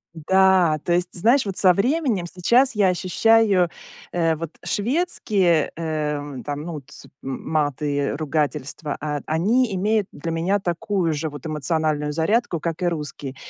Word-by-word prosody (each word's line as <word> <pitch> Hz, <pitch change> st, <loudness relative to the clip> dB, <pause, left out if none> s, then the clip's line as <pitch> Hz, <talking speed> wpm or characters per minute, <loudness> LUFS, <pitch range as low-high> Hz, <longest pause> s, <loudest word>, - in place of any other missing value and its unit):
М-да, 185 Hz, -1 st, +3 dB
то -, -, -2 dB
есть, 175 Hz, +1 st, +1 dB
знаешь, 235 Hz, +9 st, +3 dB
вот 195 Hz, -2 st, -4 dB
со 185 Hz, -, +5 dB
временем 245 Hz, -, 0 dB
сейчас 235 Hz, +10 st, +2 dB
я 205 Hz, -2 st, +3 dB
ощущаю, 190 Hz, +1 st, +3 dB, 0.4 s
э, 165 Hz, -2 st, +1 dB
вот 165 Hz, 0 st, -5 dB, 0.2 s
шведские, 205 Hz, -, +1 dB
э, 150 Hz, -3 st, -3 dB
там, 145 Hz, 0 st, -4 dB
ну 170 Hz, 0 st, -6 dB
вот, 145 Hz, -, -7 dB, 0.4 s
м 135 Hz, -1 st, -5 dB
маты 145 Hz, -1 st, 0 dB
и 140 Hz, 0 st, 0 dB
ругательства, 150 Hz, -1 st, -2 dB
а, 150 Hz, -1 st, -3 dB
они 210 Hz, +8 st, +1 dB
имеют 210 Hz, +1 st, +1 dB
для 165 Hz, -, -5 dB
меня 175 Hz, +5 st, 0 dB
такую 175 Hz, -1 st, -1 dB
же 155 Hz, +1 st, -3 dB
вот 145 Hz, -3 st, -10 dB
эмоциональную 155 Hz, 0 st, -1 dB
зарядку, 170 Hz, +4 st, 0 dB
как 165 Hz, +1 st, -4 dB
и 180 Hz, -, +1 dB
русские. 145 Hz, -4 st, -4 dB
170 Hz, 150 wpm, -22 LUFS, 150-195 Hz, 0.4 s, со